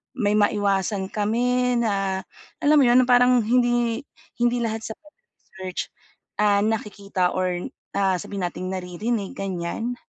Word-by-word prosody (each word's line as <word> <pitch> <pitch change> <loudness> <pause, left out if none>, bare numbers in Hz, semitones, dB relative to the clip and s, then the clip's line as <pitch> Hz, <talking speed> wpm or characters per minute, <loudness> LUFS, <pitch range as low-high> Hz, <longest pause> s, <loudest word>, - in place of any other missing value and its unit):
may 210 -5 +1
maiwasan 200 -2 +1
kami 245 +3 +1
na 195 -4 0 0.4
alam 295 +1 +4
mo - - +6
'yon, 245 +1 +5
parang 250 0 +5
hindi 240 0 +2 0.4
hindi 240 0 +2
lahat 225 -1 -2
sa 220 - -6
pagre-research, 300 - -9 0.6
ah, 205 -1 +4
nakikita 205 -4 -1
or, 180 -1 -1 0.3
ah, 190 -2 +2
sabihin 195 +2 -5
nating 180 +1 -5
naririnig, 190 +4 -3
ganyan? 195 +5 -3
210 Hz, 125 wpm, -24 LUFS, 190-240 Hz, 0.6 s, mo